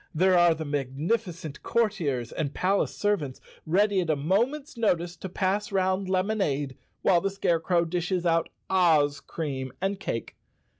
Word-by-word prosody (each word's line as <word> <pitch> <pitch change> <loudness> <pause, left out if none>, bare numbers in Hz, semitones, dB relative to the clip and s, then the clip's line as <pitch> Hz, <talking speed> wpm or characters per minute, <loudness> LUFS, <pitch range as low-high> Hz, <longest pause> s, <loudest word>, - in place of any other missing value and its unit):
There 185 +3 +4
are 175 -2 +5
the 160 0 -5
magnificent 155 - -2
courtiers 150 - 0
and 150 -3 -3
palace 195 +2 +1
servants, 180 -11 -1 0.3
ready 195 +3 +3
at 170 - -3
a 155 - +3
moment's 235 - 0
notice 175 -6 0
to 190 - -6
pass 195 +3 -1
round 190 0 +1
lemonade, 185 -9 0 0.3
while 175 -3 +4
the 195 - 0
Scarecrow 175 -2 +1
dishes 180 +1 -1
out 165 -1 +2 0.2
Oz 155 -6 +3
cream 135 -5 -4
and 195 +1 -1
cake. 115 - -4
175 Hz, 145 wpm, -27 LUFS, 155-195 Hz, 0.3 s, are